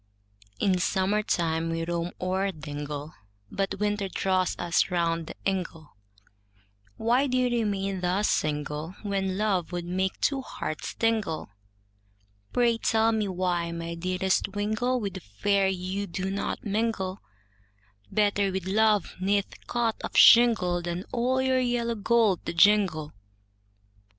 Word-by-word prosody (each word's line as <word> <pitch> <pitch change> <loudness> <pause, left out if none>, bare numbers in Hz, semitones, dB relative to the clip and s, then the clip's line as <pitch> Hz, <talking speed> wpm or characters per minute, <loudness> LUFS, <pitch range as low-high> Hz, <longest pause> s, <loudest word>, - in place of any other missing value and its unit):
In 185 -2 +2
summer 195 +3 +1
time 165 -5 0
we 165 0 -2
roam 170 0 -2
o'er 190 +2 0
dingle, 150 -1 -6 0.4
But 195 0 -2
winter 205 -1 0
draws 185 -1 0
us 170 +3 +1
round 165 -2 0
the - - -8
ingle, 175 - -3 1.0
Why 245 +5 +2
do 255 -1 0
you 250 -1 +2
remain 195 -5 -1
thus 185 +4 +1
single, 150 +3 -2
When 195 -2 -1
love 195 -5 0
would 175 -1 -4
make 185 +2 -2
two 275 -2 +1
hearts 155 - -5
tingle, 220 - -1 1.0
Pray, 235 -2 +2
tell 225 0 +2
me 215 -2 0
why 180 -2 -1
my 170 0 -5
dearest 185 +3 0
wingle, 220 +5 0
With 200 -4 -3
the 190 - -6
fair 195 - +1
you 190 +2 -3
do 190 +2 -3
not 200 - -3
mingle, 205 -3 -1 0.9
Better 205 -2 +2
with 190 -1 -3
love 210 0 +2
'neath 200 +1 -1
cot 235 -2 0
of - - -4
shingle, 220 -7 +6
Than 175 +1 -4
all 255 +2 +1
your 260 0 +2
yellow 240 -2 0
gold 220 -3 +2
to - - -2
jingle. 175 -5 +3
195 Hz, 135 wpm, -27 LUFS, 175-215 Hz, 1.0 s, shingle